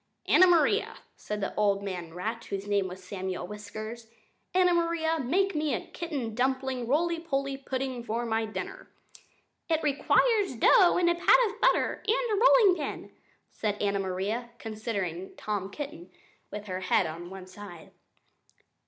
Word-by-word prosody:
"Anna 370 - +6
Maria," 355 +5 +3 0.2
said 210 0 -5
the 195 - -2
old 200 -1 +1
man 180 -4 -5
rat 220 +6 -4
(whose 195 0 -5
name 200 -2 +1
was 185 +1 -9
Samuel 185 -1 -4
Whiskers), 215 +3 -8 0.4
"Anna 365 -1 +4
Maria, 335 -1 +1
make 370 +9 +1
me 300 -4 0
a - - -5
kitten 280 -10 -4
dumpling 260 0 -1
roly 335 +5 +1
poly 275 -4 -2
pudding 265 -2 -4
for 235 +1 -2
my 225 -1 0
dinner." 185 -4 -7 0.8
"It 320 -1 +1
requires 400 - +2
dough 380 -8 +5
and 355 -1 +3
a 345 - +4
pat 345 +7 +5
of 430 +2 -9
butter - - +2
and 470 +1 +1
a 420 +2 +2
rolling 450 -7 +6
pin," 295 - -5 0.4
said 210 -1 -2
Anna 200 -1 0
Maria, 195 +6 -2
considering 205 -6 -4
Tom 205 -2 -3
Kitten 200 - -7 0.4
with 210 0 -7
her 185 -2 -4
head 185 0 +2
on 170 +2 -6
one 190 -1 -9
side. 185 -3 -11
230 Hz, 155 wpm, -28 LUFS, 195-325 Hz, 0.8 s, Anna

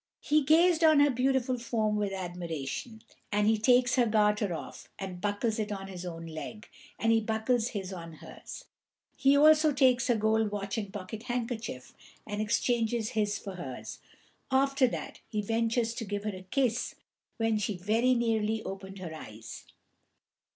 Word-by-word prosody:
He 305 +1 +3
gazed 330 +4 +4
on 310 -2 +7
her 290 0 +5
beautiful 255 0 +1
form 220 -3 0
with 205 -1 0
admiration, 175 - -5 0.3
and 205 0 +2
he 220 0 +3
takes 250 +2 +4
her 245 -2 +4
garter 210 -2 +2
off, 165 - -7
and 185 -2 -6
buckles 210 +2 -1
it 210 0 -2
on 195 -1 -4
his 180 -1 -7
own 165 -1 -6
leg, 165 +7 -7 0.3
and 225 - +2
he 225 0 +4
buckles 220 +2 0
his 195 -5 -5
on 170 -2 -8
hers; 155 - -10 0.5
he 275 +1 +4
also 310 +1 +6
takes 255 -3 +3
her 240 - +3
gold 220 0 +2
watch 200 -1 -4
and 205 -4 -4
pocket 205 +2 -6
handkerchief, 230 - -4 0.3
and 210 -1 -3
exchanges 230 0 +1
his 210 -4 0
for 195 -3 -8
hers; 130 -7 -7 0.5
after 275 0 +3
that - - -5
he 215 - -2
ventures 230 +2 0
to 230 - -5
give 205 -1 -4
her 210 -2 -3
a 185 0 -11
kiss, 250 -2 0 0.4
when 225 -1 +1
she 205 -2 -2
very 225 +7 +2
nearly 220 -2 0
opened 195 0 -7
her 175 -4 -6
eyes. 110 -8 -9
220 Hz, 165 wpm, -30 LUFS, 195-245 Hz, 0.5 s, on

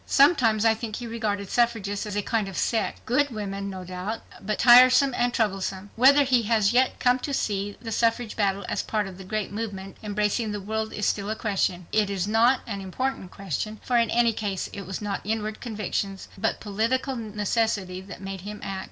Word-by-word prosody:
Sometimes 245 -7 +4
I 225 - +6
think 220 -1 -5
he 245 - -6
regarded 210 -4 -3
suffragists 220 -4 0
as 205 - -5
a 205 - 0
kind 220 -2 0
of 195 - -7
sect 225 - -1
good 285 +4 +2
women, 200 -3 -4
no 190 -1 -6
doubt, 185 +5 -5 0.2
but 210 +1 -2
tiresome 255 +2 +7
and 245 0 +1
troublesome. 195 -3 -2
Whether 275 +4 +6
he 255 -3 +3
has 220 -2 +3
yet 255 +1 +2
come 250 +1 +3
to 280 +1 -2
see 205 -3 -2
the 225 -1 -7
suffrage 230 +1 0
battle 200 -2 0
as - - -1
part 215 -2 -1
of 190 -1 -9
a - - -8
great 210 +1 -3
movement 200 -3 -5
embracing 210 +1 -1
the 205 - -3
world 220 +2 -3
is 210 - -3
still 200 0 0
a 220 - -1
question. 195 -5 -1
It 215 -2 +2
is 195 -1 -1
not 230 +4 +4
an 200 -4 -5
important 195 +1 -3
question, 200 +4 -4
for 250 - -1
in 230 -2 +3
any 235 -1 +3
case 205 -3 -3
it 200 -3 -7
was 190 +2 -5
not 200 -1 -2
inward 215 0 -3
conviction 205 -3 -3 0.2
but 190 - -1
political 230 +6 -1
necessity 210 -3 -1
that 195 0 -10
made 195 -1 -6
him 210 +2 -7
act. 195 -1 -4
215 Hz, 205 wpm, -26 LUFS, 195-230 Hz, 0.2 s, tiresome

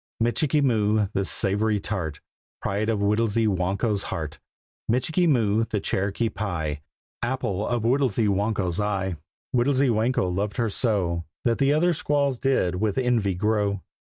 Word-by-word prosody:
Michikee 130 +6 +2
Moo, 110 -4 +2
the 100 - 0
Savoury 105 +2 +1
Tart, 90 -7 -3 0.4
Pride 105 +3 -1
of 110 -3 0
Whittlesy 105 +2 +2
Whanko's 100 +2 0
heart. 80 -5 -5 0.5
Michikee 160 +9 +2
Moo, 115 -5 +2
the 110 -2 -2
Cherokee 100 +4 -1
Pie, 85 -9 -3 0.4
Apple 120 -5 -2
of 120 -2 -1
Whittlesy 120 -3 +2
Whanko's 100 -2 0
eye. 95 -3 -1 0.4
Whittlesy 130 +2 +3
Whanko 110 -2 +1
loved 100 +1 -2
her 115 -3 0
so 90 -8 0 0.2
That 115 -1 +2
the 140 0 +3
other 170 +4 +3
squaws 140 -4 0
did 95 -10 +1
with 105 -2 0
envy 120 -7 +1
glow. 100 -1 0
110 Hz, 140 wpm, -25 LUFS, 100-120 Hz, 0.5 s, Whittlesy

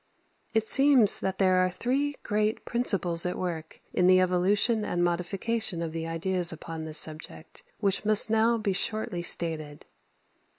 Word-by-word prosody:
It 220 0 0
seems 270 -7 +4
that 190 0 -4
there 185 -1 +2
are 185 0 +1
three 265 +10 -3
great 215 +1 -2
principles 190 -8 +1
at 180 - -2
work 165 -3 -6
in 180 - +1
the 185 0 +5
evolution 195 +5 +1
and 175 -3 -2
modification 180 +2 -1
of 165 - -5
the 165 0 -5
ideas 175 +2 +1
upon 160 0 -8
this 155 0 -1
subject, 155 - -2 0.2
which 200 -1 -1
must 215 0 +3
now 225 +1 +1
be 210 -3 -2
shortly 195 -2 -1
stated. 160 -4 0
185 Hz, 155 wpm, -26 LUFS, 170-220 Hz, 0.2 s, the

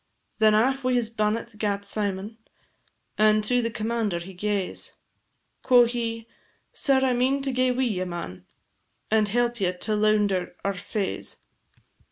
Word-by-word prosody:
Then 215 -1 +5
aff 265 +5 +2
wi' 255 0 +1
his 230 -2 +1
bannet 225 +1 -1
gat 200 -2 -1
Symon, 205 +1 -3 0.8
And 215 0 +4
to 245 +3 +2
the 230 - -1
commander 220 -3 -1
he 175 +3 -8
gaes; 200 0 -2 0.7
Quo' 245 -2 +6
he, 230 -1 -3 0.5
"Sir, 270 -2 +3
I 260 -1 +3
mean 265 +3 +1
to 270 - -1
gae 255 0 +2
wi' 250 +1 0
ye, 205 -7 -1
man, 170 - -7 0.6
And 215 -1 +3
help 240 +1 0
ye 180 -2 +2
to 210 +4 -3
lounder 210 -3 +1
our 200 - +1
faes. 195 +1 -4
215 Hz, 150 wpm, -25 LUFS, 200-240 Hz, 0.8 s, Quo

